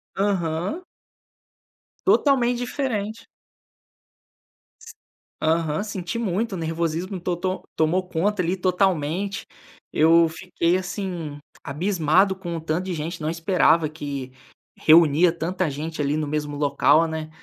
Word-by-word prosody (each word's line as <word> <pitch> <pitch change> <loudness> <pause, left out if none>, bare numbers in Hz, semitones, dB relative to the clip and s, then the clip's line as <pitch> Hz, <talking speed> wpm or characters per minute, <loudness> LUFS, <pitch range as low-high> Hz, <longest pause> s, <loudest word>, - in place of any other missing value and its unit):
Aham. 190 - -1 1.2
Totalmente 245 -4 +3
diferente. 230 -4 -3 2.1
Aham, 160 +2 +1
senti 190 -2 -4
muito 220 0 -1
o - - -3
nervosismo, 170 +3 -2
to 180 0 -2
to 185 +2 -3
tomou 180 +4 +1
conta, 185 +4 0
ali, 175 +1 0
totalmente. 185 0 0 0.5
Eu 165 +1 +5
fiquei, 175 +1 0
assim, 180 -5 -5 0.3
abismado 180 +4 +2
com 175 -3 -5
o 165 - -4
tanto 160 +3 -2
de 190 - -3
gente. 165 +1 -5
Não 155 - -1
esperava 165 -1 +2
que 140 -4 -6 0.5
reunia 165 +1 +5
tanta 170 +1 -2
gente 155 +3 -4
ali 145 +1 0
no 155 -1 -1
mesmo 150 0 -3
local, 145 +2 +3
né. 160 -1 -5
170 Hz, 115 wpm, -23 LUFS, 155-190 Hz, 2.1 s, Eu